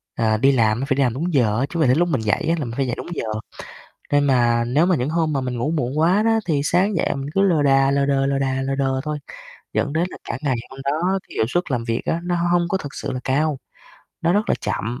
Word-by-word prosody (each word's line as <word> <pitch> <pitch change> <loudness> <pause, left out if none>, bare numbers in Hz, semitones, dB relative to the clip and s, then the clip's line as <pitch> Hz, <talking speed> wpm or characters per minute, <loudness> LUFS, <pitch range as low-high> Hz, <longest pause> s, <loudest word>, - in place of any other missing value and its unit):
à, 110 -1 +1
đi 135 +4 +4
làm 115 -3 +2
á - - -1
phải 135 - +2
đi 140 - +2
làm 120 -3 +1
đúng 165 +6 -3
giờ 115 -4 +2
á, 135 - +1
chứ 170 - -4
mà 150 - +4
đến 130 +4 +4
lúc 175 0 +2
mình 130 -7 0
dậy 105 +6 0
á 170 - +3
là 140 - -2
mình 115 - -6
phải 135 -2 0
dậy 120 - -2
đúng - - -7
giờ. - - -3 0.9
Nên 145 0 +4
mà 120 -3 +3
nếu 145 +8 +2
mà 180 -3 +3
những 125 +5 -1
hôm 160 -2 0
mà 135 - 0
mình 125 -2 -3
ngủ 140 +6 -1
muộn 145 -2 -1
quá 180 +6 +3
đó 225 0 +3
thì 150 -4 +1
sáng 185 +5 +2
dậy - - 0
mình 135 +1 -5
cứ 195 - +3
lờ 170 -7 +3
đà, 135 -1 +4
lờ 140 0 +1
đờ, 135 -1 +1
lờ 140 0 0
đà, 135 -1 -1
lờ 135 +1 -1
đờ 135 -1 0
thôi, 150 -1 -3 0.5
dẫn 145 - 0
đến 165 +3 +1
là - - -9
cả 120 - -3
ngày 135 -4 +1
hôm 135 0 -10
đó 175 +7 0
cái - - -12
hiệu - - +2
suất 175 +1 -1
làm 120 -3 -1
việc 115 0 -2
á, 165 - 0
nó 175 0 0
hông 175 0 0
hông 175 -1 +2
có 190 - 0
thực 145 -6 -8
sự - - -4
là 125 - -4
cao, 145 +1 +1 0.6
nó 170 0 +2
rất 210 +2 +1
là - - +4
chậm 120 +4 -3
140 Hz, 295 wpm, -21 LUFS, 130-165 Hz, 0.9 s, đi